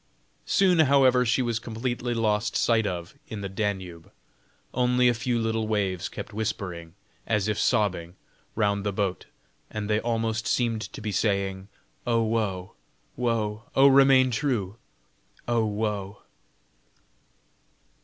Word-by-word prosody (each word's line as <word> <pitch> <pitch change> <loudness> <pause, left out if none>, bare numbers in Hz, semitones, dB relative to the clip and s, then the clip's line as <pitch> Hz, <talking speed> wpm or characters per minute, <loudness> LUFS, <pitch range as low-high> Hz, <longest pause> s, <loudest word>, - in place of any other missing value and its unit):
Soon, 185 -3 +3
however, 130 -4 +5
she 125 +3 +2
was 120 -2 -1
completely 120 +2 -3
lost 105 -1 0
sight 115 -2 +2
of 85 -2 -5
in 110 -2 -6
the 100 - -3
Danube; 95 -4 -4 0.6
only 125 0 +3
a 120 - +4
few 120 +1 -1
little 115 -1 -1
waves 100 -4 -1
kept - - -8
whispering, 95 -6 -4 0.3
as 105 -2 +1
if 105 -1 -1
sobbing, 95 -7 0 0.4
round 100 -2 +1
the 105 - -1
boat, 95 -1 -2 0.4
and 105 -1 -4
they 105 0 +2
almost 115 -1 -1
seemed 115 -3 0
to 110 - -8
be 105 0 -3
saying: 95 -1 -1 0.4
"Oh 115 -1 +2
woe, 105 -5 -2 0.4
woe! 115 -2 -1
oh 135 +1 +7
remain 135 -1 +6
true! 115 -6 -1 0.7
oh 115 -2 +1
woe!" 105 -1 -3
110 Hz, 130 wpm, -26 LUFS, 100-120 Hz, 0.7 s, oh